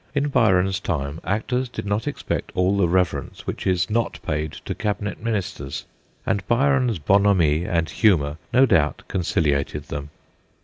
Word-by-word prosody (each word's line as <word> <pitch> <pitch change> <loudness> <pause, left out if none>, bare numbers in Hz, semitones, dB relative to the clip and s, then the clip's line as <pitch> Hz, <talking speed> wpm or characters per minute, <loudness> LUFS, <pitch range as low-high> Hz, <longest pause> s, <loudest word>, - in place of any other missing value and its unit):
In 145 +1 +1
Byron's 95 -7 +3
time 75 -5 -3
actors 125 +6 -1
did 120 - -6
not 105 +6 -1
expect 145 - -3
all 90 +2 +2
the 100 -3 +3
reverence 90 0 -1
which - - -4
is 90 -1 +2
not 115 +1 -1
paid 75 0 -2
to - - -2
cabinet 105 0 -3
ministers, 100 -11 -3 0.4
and 100 - +1
Byron's 125 -2 +2
'bonhomie 90 -2 +3
and 85 -2 0
humour 80 -9 +2
no 130 +2 +6
doubt 80 - +2
conciliated 75 -4 -1
them. 70 0 -5
95 Hz, 145 wpm, -23 LUFS, 80-110 Hz, 0.4 s, no